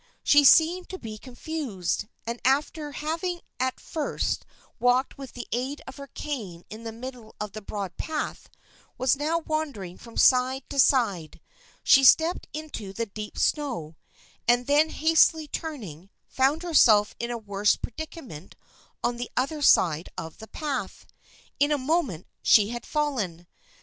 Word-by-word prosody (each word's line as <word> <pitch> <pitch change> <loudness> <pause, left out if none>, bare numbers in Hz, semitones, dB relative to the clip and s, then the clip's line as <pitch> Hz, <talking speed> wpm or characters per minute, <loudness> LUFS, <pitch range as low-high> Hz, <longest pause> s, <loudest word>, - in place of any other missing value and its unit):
She 290 0 +6
seemed 335 +6 +5
to 375 - -5
be 220 -8 -8
confused, 245 - -4 0.2
and 235 +1 -4
after 295 +3 +1
having 335 +4 -3 0.2
at 260 0 -1
first 310 -3 -3 0.3
walked 245 +2 +2
with 270 -2 -8
the 245 - -6
aid 260 +5 -2
of - - -10
her 280 0 -8
cane 215 - -6
in 220 +2 -8
the 225 - -5
middle 235 -1 -9
of 210 -1 -4
the 215 - -8
broad 200 -3 -5
path, 310 -2 -4 0.5
was 255 +1 +3
now 305 +4 0
wandering 295 - -4
from 230 -1 -12
side 255 +1 +4
to 280 - -2
side. 205 - +2 0.4
She 270 - +6
stepped 320 +6 +5
into 295 -10 -6
the 230 +3 -2
deep 210 0 -8
snow, 240 - -1 0.5
and 240 +1 +4
then 295 +3 +4
hastily 320 0 +3
turning, 210 - -6 0.2
found 275 +5 +1
herself 220 -11 +5
in 235 - -3
a 240 - -2
worse 205 -2 +1
predica 315 +5 -7
ment 155 -7 -11 0.5
on 240 - 0
the 245 0 -5
other 290 +4 0
side 165 - +4
of 160 -1 -7
the 220 - -10
path. 290 +1 -4 0.5
In 290 +1 +3
a 295 - +3
moment 265 - -1 0.2
she 210 -2 +5
had 240 0 -6
fallen. 225 - -2
255 Hz, 155 wpm, -26 LUFS, 215-300 Hz, 0.5 s, She